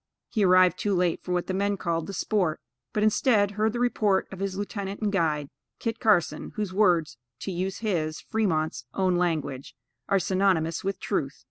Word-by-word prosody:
He 220 -4 +1
arrived 185 -1 +5
too 205 -2 +1
late 175 -2 +1
for 180 - -5
what 180 -1 0
the 190 - -3
men 200 +1 0
called 165 -3 -2
the 200 - -6
sport; 185 -4 0 0.3
but 210 - 0
instead, 215 -1 +3
heard 215 +2 +1
the 240 - -4
report 215 -5 +2
of 190 - -8
his 195 -1 -2
lieutenant 200 -1 -4
and 210 -2 0
guide, 155 -6 0 0.3
Kit 225 -1 -3
Carson, 210 -8 +1
whose 210 -3 -3
words, 180 - +2 0.2
to 195 - -3
use 185 +3 -3
his 155 -5 -1
(Fremont's) 165 -8 -1
own 185 -2 +2
language, 155 -6 -2 0.3
"are 200 - +4
synonymous 185 -3 +1
with 195 0 -2
truth." 145 -9 -2
190 Hz, 185 wpm, -26 LUFS, 170-205 Hz, 0.3 s, arrived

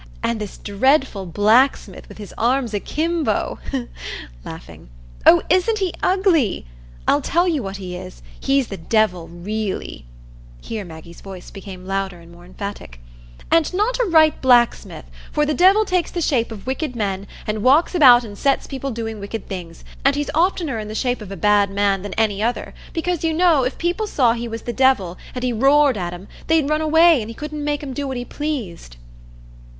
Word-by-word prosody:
And 230 -2 -1
this 210 - -6
dreadful 210 -1 +1
blacksmith 215 +9 +2
with - - -12
his 205 -2 -9
arms 245 0 0
akimbo, 315 +10 -1 0.8
laughing,—oh, - - 0
isn't 370 +5 +2
he 380 -4 -1
ugly?—I'll 245 - 0
tell 345 +6 +1
you 315 -6 0
what 195 -2 -5
he 185 -2 -7
is. - - -10 0.2
He's 275 -2 +1
the 195 - -5
Devil 180 -1 0
really" 175 - -5 0.5
(here 220 -2 -5
Maggie's 170 -1 -12
voice 190 -2 -10
became 190 -2 -10
louder 195 -2 -3
and 170 0 -16
more 175 0 -15
emphatic), 185 - -8 0.5
"and 330 -2 +3
not 445 +6 0
a - - +3
right 315 -5 +4
blacksmith; 245 -2 +2 0.3
for 300 -1 +1
the 300 - 0
Devil 385 +6 +5
takes 365 -3 0
the 350 - -4
shape 250 -8 0
of 210 -3 -9
wicked 260 +1 -3
men, 200 -3 -3 0.2
and 215 0 -2
walks 280 - +4
about 255 -8 +7
and 210 -3 -9
sets 275 -1 +1
people 275 0 -5
doing 225 -3 -5
wicked 200 +1 -6
things, 175 -3 -8 0.2
and 275 +1 +3
he's 290 0 -2
oftener 325 - +1
in 215 - -6
the 215 - -6
shape 245 0 -1
of 200 -2 -9
a 195 - -6
bad 205 +2 +3
man 195 -1 +1
than 200 -1 -6
any 210 -2 +1
other, 235 +3 -2 0.2
because, 345 0 -2
you 325 -1 +1
know, 330 -5 +4
if 255 - -2
people 355 +6 -1
saw 250 - +2
he 235 0 -4
was 225 0 -6
the 240 - -4
Devil, 245 -10 +2 0.2
and 250 - -4
he 250 -1 0
roared 275 +3 +4
at 175 -3 -3
'em, 175 +3 -9 0.2
they'd 320 -3 +3
run 305 0 +1
away, 320 -2 +5
and 215 - -6
he 230 - -8
couldn't 300 +1 -6
make 295 0 -2
'em 270 -2 -5
do 280 +1 -3
what 265 -1 -4
he 245 - -4
pleased." 225 - -5
235 Hz, 185 wpm, -20 LUFS, 195-300 Hz, 0.8 s, about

